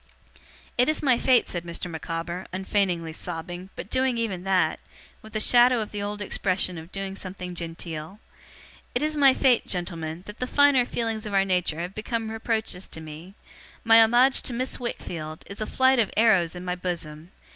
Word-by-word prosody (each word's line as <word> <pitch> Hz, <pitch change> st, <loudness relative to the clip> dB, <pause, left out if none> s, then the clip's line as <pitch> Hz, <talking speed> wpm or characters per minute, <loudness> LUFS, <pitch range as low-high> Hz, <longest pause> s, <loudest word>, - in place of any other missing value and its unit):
'It 250 Hz, -, +5 dB
is 310 Hz, 0 st, 0 dB
my 260 Hz, -4 st, +5 dB
fate,' 250 Hz, +1 st, +3 dB
said 175 Hz, -2 st, -3 dB
Mr. 170 Hz, +1 st, -4 dB
Micawber, 170 Hz, +2 st, -5 dB
unfeignedly 185 Hz, -3 st, -1 dB
sobbing, 175 Hz, +2 st, -5 dB
but -, -, -7 dB
doing 260 Hz, -2 st, +1 dB
even 200 Hz, -6 st, -2 dB
that, 185 Hz, -5 st, +2 dB, 0.4 s
with 220 Hz, 0 st, -14 dB
a -, -, +1 dB
shadow 245 Hz, +2 st, +5 dB
of 215 Hz, -, -4 dB
the 205 Hz, -, -4 dB
old 205 Hz, 0 st, -3 dB
expression 185 Hz, -3 st, -1 dB
of 165 Hz, +3 st, -12 dB
doing 195 Hz, -1 st, -5 dB
something 185 Hz, -2 st, -6 dB
genteel; 165 Hz, +1 st, -5 dB, 0.8 s
'it 245 Hz, -, +1 dB
is 310 Hz, 0 st, 0 dB
my 280 Hz, -2 st, +7 dB
fate, 260 Hz, -2 st, +3 dB
gentlemen, 170 Hz, -2 st, -4 dB
that 210 Hz, +2 st, -10 dB
the 250 Hz, -, -2 dB
finer 285 Hz, -2 st, +5 dB
feelings 225 Hz, -2 st, -2 dB
of 205 Hz, -, -3 dB
our 195 Hz, 0 st, +4 dB
nature 180 Hz, -4 st, 0 dB
have 175 Hz, +2 st, -5 dB
become 225 Hz, +1 st, -3 dB
reproaches 220 Hz, -4 st, -2 dB
to -, -, -7 dB
me. 160 Hz, +5 st, -10 dB, 0.5 s
My 225 Hz, 0 st, +7 dB
homage 245 Hz, +4 st, +5 dB
to 250 Hz, -, -4 dB
Miss 255 Hz, +2 st, -3 dB
Wickfield, 160 Hz, -10 st, -5 dB
is 200 Hz, +2 st, -8 dB
a 215 Hz, -, -2 dB
flight 260 Hz, -1 st, +3 dB
of 220 Hz, -, +2 dB
arrows 195 Hz, -7 st, +4 dB
in 180 Hz, 0 st, -7 dB
my 180 Hz, -, -1 dB
bosom. 170 Hz, -3 st, -5 dB
195 Hz, 185 wpm, -26 LUFS, 175-230 Hz, 0.8 s, my